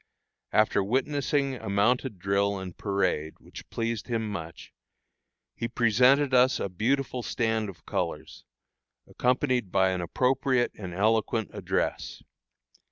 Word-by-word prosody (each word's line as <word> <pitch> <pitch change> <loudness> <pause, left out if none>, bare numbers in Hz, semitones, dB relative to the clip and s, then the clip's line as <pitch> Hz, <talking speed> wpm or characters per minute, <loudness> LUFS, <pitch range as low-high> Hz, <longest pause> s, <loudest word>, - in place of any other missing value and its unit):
After 105 -2 +3
witnessing 140 +4 0
a 100 - -7
mounted 105 +3 +1
drill 100 +2 0
and 95 -2 -7
parade, 100 -6 -1
which - - -13
pleased 115 -2 -3
him 115 -2 -1
much, 85 -5 -7 0.8
he 115 - -3
presented 125 +4 +3
us 130 +1 +4
a 100 - -2
beautiful 125 +7 -1
stand 110 -3 -1
of 85 -3 -13
colors, 80 -5 -4 0.6
accompanied 125 -4 0
by 95 0 +3
an 90 -1 -2
appropriate 125 +6 +1
and 90 -4 -8
eloquent 110 +2 +1
address. - - -2
110 Hz, 120 wpm, -27 LUFS, 95-125 Hz, 0.8 s, us